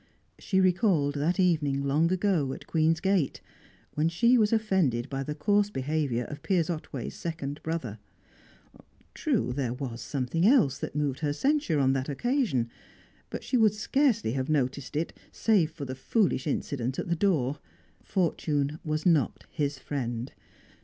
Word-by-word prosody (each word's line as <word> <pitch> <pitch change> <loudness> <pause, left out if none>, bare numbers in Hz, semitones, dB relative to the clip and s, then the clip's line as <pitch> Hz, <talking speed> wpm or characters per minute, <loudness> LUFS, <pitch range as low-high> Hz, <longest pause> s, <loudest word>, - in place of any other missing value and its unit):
She 190 - +1
recalled 180 -6 +3
that 155 +6 0
evening, 150 -7 +2
long 150 +5 +2
ago, 180 -8 +1
at - - -9
Queen's 160 0 +2
Gate, 190 -6 +1 0.5
when 155 +2 +1
she 235 +9 +4
was 215 -3 +3
offended 190 - +1
by 135 0 -2
the 150 +2 -4
coarse 205 +6 +2
behaviour 135 - -1
of 145 +3 -8
Piers 175 -4 +1
Otway's 150 -6 -5
second 155 -4 -5
brother. 135 -10 -4 1.1
True, 125 - 0
there 125 -3 -1
was 125 -3 -5
something 140 +4 -2
else 215 - +4
that - - -5
moved 145 -3 -1
her 150 -2 0
censure 275 - +1
on 135 -1 +3
that 135 +1 -2
occasion, 175 - 0 0.6
but - - -6
she 255 - +1
would 215 -3 +4
scarcely 230 - +1
have 130 +2 -2
noticed 140 -2 -1
it 160 +3 -1 0.2
save 200 -8 +2
for 150 -3 -7
the 130 - -5
foolish 155 - 0
incident 130 -3 -2
at - - -3
the 170 - +1
door. 155 -7 +1 0.4
Fortune 155 -5 -1
was 155 0 -2
not 165 -6 +2
his 145 -2 -1
friend. 125 -3 -4
155 Hz, 155 wpm, -28 LUFS, 135-185 Hz, 1.1 s, she